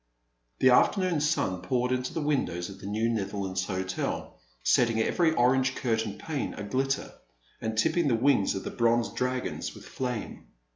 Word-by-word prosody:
The 130 - +5
afternoon 180 +4 +3
sun 95 -11 0
poured 125 +6 0
into 130 0 -1
the 160 - -3
windows 100 -12 -1
of 100 - -10
the - - -8
New 110 +3 0
Netherlands 95 -4 -2
Hotel, 95 0 -3 0.3
setting 115 - +3
every 165 +8 +2
orange 130 -1 +3
curtained 110 -4 -1
pane 155 -4 -3
a - - -6
glitter, 135 +6 -1 0.5
and 110 0 -3
tipping 160 +8 +2
the 125 - +3
wings 120 -4 +3
of 95 - -4
the - - -5
bronze 120 0 +2
dragons 125 0 -3
with - - -12
flame. 125 -4 -5
120 Hz, 160 wpm, -28 LUFS, 100-135 Hz, 0.5 s, The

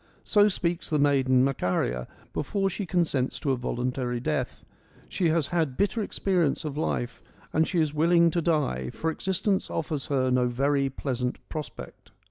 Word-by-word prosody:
So 205 -1 +5
speaks 175 -3 -1
the 155 - +2
maiden 135 -3 +4
Macaria 90 - 0 0.3
before 195 +6 -1
she 195 +1 -4
consents 160 -7 0
to 140 - 0
a - - +2
voluntary 125 0 -2
death. 75 -10 -2 0.4
She 175 -3 0
has 160 -2 +2
had 160 -7 0
bitter 205 +3 +1
experience 180 -7 0
of 145 -2 -3
life 125 -5 -2 0.3
and 160 0 +3
she 175 - 0
is 155 -2 +1
willing 170 +2 +4
to 170 - 0
die, 145 - 0
for 160 - -2
existence 190 +3 -1
offers 155 -4 -3
her 130 -2 +1
no 125 -1 +3
very 135 +3 +1
pleasant 125 -2 -2
prospect. 155 -3 -8
150 Hz, 160 wpm, -27 LUFS, 130-170 Hz, 0.4 s, So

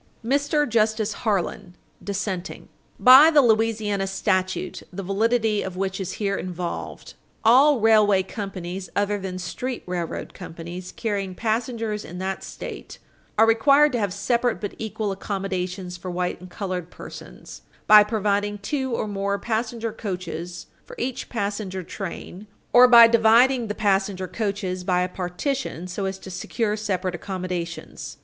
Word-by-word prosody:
MR. 290 +3 +1
JUSTICE 220 -1 +1
HARLAN, 195 -5 -2 0.3
dissenting. 195 -3 -4 0.3
By 265 +5 +9
the 300 -3 +5
Louisiana 215 -3 +1
statute 185 -1 -1
the 195 +2 -6
validity 215 +2 +1
of 185 -1 -6
which 190 0 -2
is 190 0 -4
here 200 -2 -1
involved, 180 -2 -5 0.3
all 260 +5 +6
railway 210 -3 +4
companies 190 -2 -6
(other 205 0 0
than 190 -1 -5
street 240 +8 -4
railroad 175 -2 -4
companies) 170 +2 -8
carrying 200 -4 -3
passengers 225 0 -2
in 175 - -9
that 190 +1 -3
State - - -8 0.4
are 225 - +7
required 275 +6 +5
to 245 - -1
have 205 -3 0
separate 235 +4 0
but 205 - -5
equal 220 -1 -3
accommodations 190 -2 -4
for 180 +1 -7
white 180 0 -2
and 185 - -11
colored 180 -2 -4
persons - - -11 0.2
"by 210 0 +9
providing 205 -1 0
two 260 +4 -2
or 215 - -2
more 200 0 -1
passenger 225 +1 -2
coaches 180 -5 -5 0.2
for - - -12
each 260 - -4
passenger 200 -4 -3
train, 195 +2 -7 0.3
or 250 +1 +9
by 235 -1 +10
dividing 235 +2 +4
the 210 - -3
passenger 195 -2 0
coaches 195 -1 -3
by 180 -1 +1
a 180 - +1
partition 180 - -3
so 185 +2 -4
as 190 0 -3
to 190 - -10
secure 210 +4 -2
separate 190 -4 -2
accommodations." 180 -2 -5
200 Hz, 140 wpm, -24 LUFS, 185-225 Hz, 0.4 s, by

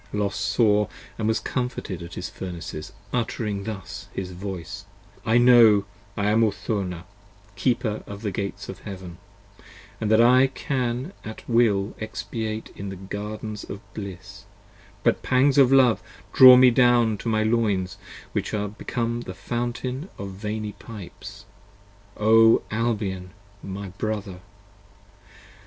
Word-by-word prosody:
Los 105 -1 -1
saw 105 +1 +2 0.2
& - - -23
was 110 +1 +1
comforted 125 -6 -3
at 85 0 -8
his 90 - -4
Furnaces, 85 -4 -7 0.2
uttering 110 -4 -2
thus 100 -2 -7
his 95 -1 -4
voice. 90 -3 -6 0.4
I 115 +2 +4
know 120 -4 +7 0.3
I 105 0 +1
am 115 +1 +4
Urthona, 100 -4 -2 0.5
keeper 120 -4 0
of 100 +2 -8
the 105 - -1
Gates 100 +1 -4
of 95 - -8
Heaven, 95 -4 -9 0.4
So - - -20 0.4
And 110 - 0
that 110 0 +5
I 125 +3 +6
can 130 +2 -2
at 110 0 -9
will 110 -4 +2
expatiate 110 0 -4
in 100 0 -6
the 95 - -6
Gardens 105 +3 -6
of 100 - -7
bliss; 100 +1 -8 0.6
But 115 - +2
pangs 135 +2 +3
of 135 -2 +6
love 130 -4 +5 0.3
draw 130 -1 +10
me 125 0 +7
down 120 -2 +4
to 115 - -3
my 110 -1 +2
loins, 100 -4 0 0.3
which - - -2
are 105 0 -1
82 105 +1 -8
Become 120 0 -2
a - - -5
fountain 125 +6 -3
of 100 0 -6
veiny 105 +2 -4
pipes: 105 -4 -11 0.7
O 115 +1 +5
Albion! 105 -5 -2 0.3
my 95 0 -6
brother! 100 -1 -4
110 Hz, 140 wpm, -24 LUFS, 100-120 Hz, 0.7 s, draw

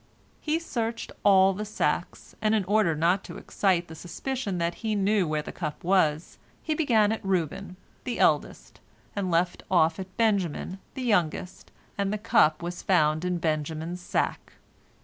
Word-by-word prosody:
He 310 +1 0
searched 235 -8 -3
all 195 -1 +6
the 205 +3 -4
sacks, 215 0 -2
and 215 0 +2
in 210 - +1
order 200 -4 +2
not 175 +5 +2
to - - -8
excite 180 -3 0
the 160 - -10
suspicion 200 - -4
that 170 0 0
he 220 -2 -1
knew 200 -2 +2
where 155 -1 -1
the - - -7
cup 155 -4 -5
was, 165 -4 +1 0.2
he 315 - 0
began 230 -9 +3
at 220 - -3
Reuben, 190 0 -2 0.3
the 245 -2 -3
eldest, 100 - 0 0.4
and 195 -2 -1
left 175 +1 +1
off 165 -2 +3
at 190 0 -8
Benjamin, 195 -4 0 0.2
the 260 - -4
youngest, 180 -6 -1 0.3
and 200 0 0
the 210 - -1
cup 165 -7 +3
was 175 0 -5
found 155 -3 +2
in 180 -1 0
Benjamin's 160 +2 -2
sack. - - -2
185 Hz, 165 wpm, -27 LUFS, 165-210 Hz, 0.4 s, all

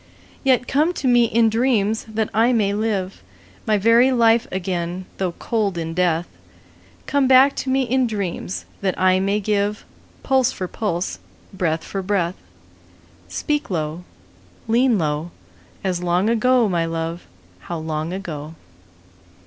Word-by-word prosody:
Yet 255 -3 +2
come 305 +5 +2
to 275 - -3
me 240 -1 +5
in 230 0 +3
dreams, 220 -2 +1
that 220 -1 -2
I 230 +4 +3
may 205 -4 +1
live 205 -3 -2 0.5
My 215 -1 +3
very 230 +5 +5
life 230 -2 +3
again 180 -1 -3
though 185 -3 -1
cold 210 -5 -1
in 165 -1 -3
death: 175 -1 +1 0.8
Come 280 -2 +2
back 265 +2 +6
to 265 - -3
me 265 +1 +2
in 255 +1 +1
dreams, 170 - -4 0.2
that 190 -2 -1
I 185 0 +4
may 200 +2 +1
give 205 0 -1 0.4
Pulse 260 -2 +2
for 185 - -5
pulse, 185 -3 -3 0.3
breath 165 -4 -1
for 195 - -4
breath: 185 -3 0 0.9
Speak 295 -1 -2
low, 160 -1 -3 0.6
lean 235 +1 +3
low, 155 0 -1 0.5
As 185 -2 -1
long 180 +5 +1
ago, 245 0 +3
my 175 -4 0
love, 165 +1 -4 0.3
how 170 - -6
long 155 +1 -3
ago! 160 -5 -6
200 Hz, 140 wpm, -21 LUFS, 175-235 Hz, 0.9 s, back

